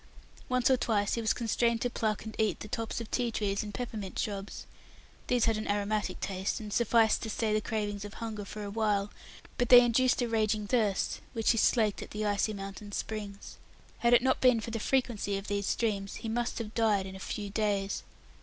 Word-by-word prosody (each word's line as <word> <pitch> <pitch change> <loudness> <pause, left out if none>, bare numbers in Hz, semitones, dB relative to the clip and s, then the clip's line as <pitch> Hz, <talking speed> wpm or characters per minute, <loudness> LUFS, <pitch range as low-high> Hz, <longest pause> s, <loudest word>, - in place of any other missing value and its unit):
Once 255 -1 +2
or 260 - +5
twice 205 -4 +1
he 230 - 0
was 220 - +2
constrained 235 0 +1
to 245 - 0
pluck 220 -3 -2
and 220 - -7
eat 220 -1 +1
the - - -6
tops 225 +2 -3
of 230 -2 -7
tea 245 -2 +1
trees 205 -3 -1
and 210 - -6
peppermint 210 -3 -5
shrubs. 200 -1 -4 0.6
These 245 -2 +3
had 225 -2 +2
an 215 - -4
aromatic 205 -1 -1
taste, 190 0 -2
and 210 -2 -6
sufficed 230 -1 +3
to 225 - -4
stay 215 0 0
the 215 - +2
cravings 205 -2 -3
of 205 0 -8
hunger 220 -3 -5
for 210 +1 -7
a 200 - -5
while, 210 -2 0 0.5
but 245 - +1
they 245 -1 +11
induced 250 +2 +3
a - - 0
raging 215 -2 +1
thirst, 210 -3 0
which 225 -2 +2
he 230 - +1
slaked 215 -4 +2
at - - -8
the 215 0 -3
icy 205 +1 +1
mountain 195 0 -7
springs. 205 -2 -5 0.4
Had 235 0 +5
it 240 - +4
not 260 0 +2
been 250 -3 +5
for 225 +1 -5
the 225 - -2
frequency 225 -5 0
of 195 - -6
these 200 0 -1
streams, 200 -4 -1
he - - -6
must 240 +1 -1
have 225 -2 -5
died 215 -4 +2
in 190 0 -8
a - - -8
few 205 +1 -5
days. 200 -2 0
215 Hz, 215 wpm, -30 LUFS, 205-230 Hz, 0.6 s, they